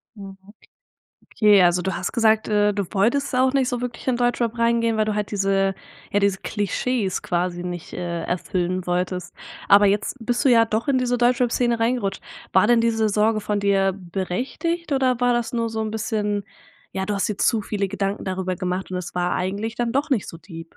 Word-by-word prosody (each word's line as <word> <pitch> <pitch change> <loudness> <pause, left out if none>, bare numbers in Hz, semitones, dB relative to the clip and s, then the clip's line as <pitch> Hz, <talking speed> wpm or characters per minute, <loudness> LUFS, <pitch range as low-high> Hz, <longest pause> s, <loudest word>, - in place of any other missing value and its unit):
Mhm. 195 -2 -10 1.0
Okay, 210 -3 +5
also 175 0 +3
du 190 - -2
hast - - -3
gesagt, 220 -1 +3
äh, 210 -1 +3
du 200 -2 -1
wolltest 245 +7 +1
auch 255 +1 +3
nicht 270 -2 +2
so 245 -1 -2
wirklich 245 0 -6
in 250 - +2
Deutschrap 240 -1 0
reingehen, 230 -1 +2
weil 215 - +2
du 215 0 -1
halt 210 -1 -2
diese 195 -1 +1 0.4
ja, 205 - +2
diese 200 -1 +1
Klischees 205 +1 -2
quasi 175 0 -2
nicht, 175 -2 -6
äh, 170 -2 -4
erfüllen 180 0 -2
wolltest, 180 0 -2 0.3
aber 205 +1 +7
jetzt 205 +6 0
bist 245 +4 0
du - - +5
ja 230 -2 +6
doch 225 +2 -2
in 265 -2 +3
diese 245 -1 0
Deutschrap-Szene 240 -1 +2
reingerutscht. 225 -4 0 0.3
War 190 +2 +5
denn 240 0 +4
diese 225 -2 +1
Sorge 215 +1 +2
von 205 0 -1
dir 195 -1 +2
berechtigt 245 - -3
oder 260 -3 +2
war 245 0 +3
das 240 -1 -1
nur 230 -1 -1
so 220 - -3
'n 220 0 -2
bisschen 210 -2 -2 0.5
ja, 190 0 -3
du 210 - -1
hast 200 - 0
dir 210 - -3
zu 220 -2 +2
viele 200 -1 -2
Gedanken 200 +1 -3
darüber 185 -1 -2
gemacht 185 +1 -3
und 185 - -3
es 180 -1 -6
war 180 0 0
eigentlich 200 +5 -3
dann 240 -1 -1
doch 285 +3 0
nicht 230 -7 0
so 165 - -9
deep? 165 -2 -11
210 Hz, 200 wpm, -23 LUFS, 190-235 Hz, 1.0 s, aber